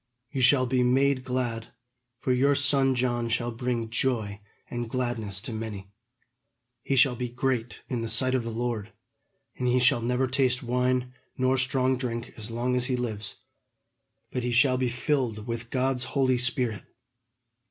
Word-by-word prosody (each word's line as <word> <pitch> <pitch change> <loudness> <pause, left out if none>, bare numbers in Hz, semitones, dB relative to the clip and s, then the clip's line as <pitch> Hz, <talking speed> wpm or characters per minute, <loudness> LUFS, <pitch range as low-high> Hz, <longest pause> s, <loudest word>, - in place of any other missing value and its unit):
You 135 - -2
shall 130 +1 +5
be 125 0 +1
made 130 +1 +3
glad, 125 -3 -2 0.5
for 130 - +1
your 140 +3 +3
son 135 -1 +2
John 120 -1 0
shall 120 +1 0
bring 120 -1 -2
joy 115 -5 0 0.3
and 120 -1 -4
gladness 115 -6 -2
to 120 0 -6
many. 105 -3 -6 0.9
He 135 - -1
shall 130 -1 +5
be 125 0 -3
great 120 -1 -2
in 120 -3 -2
the 115 - -2
sight 130 +3 +4
of 130 -2 +1
the 115 - -4
Lord; 115 -2 -3 0.6
and 125 - -1
he 125 +1 +3
shall 125 -1 +3
never 125 +3 +1
taste 130 -1 +1
wine 125 +1 0 0.2
nor 130 0 +2
strong 130 0 +2
drink 120 -2 -4
as 110 0 -7
long 120 +2 -1
as 125 -1 +1
he 130 - 0
lives; 110 -5 -4 1.0
but 125 - -2
he 125 - -1
shall 130 +2 +4
be 130 -1 +1
filled 120 -4 -1
with 115 0 -4
God's 130 0 0
Holy 130 -3 +1
Spirit. 125 -3 0
125 Hz, 165 wpm, -27 LUFS, 115-130 Hz, 1.0 s, shall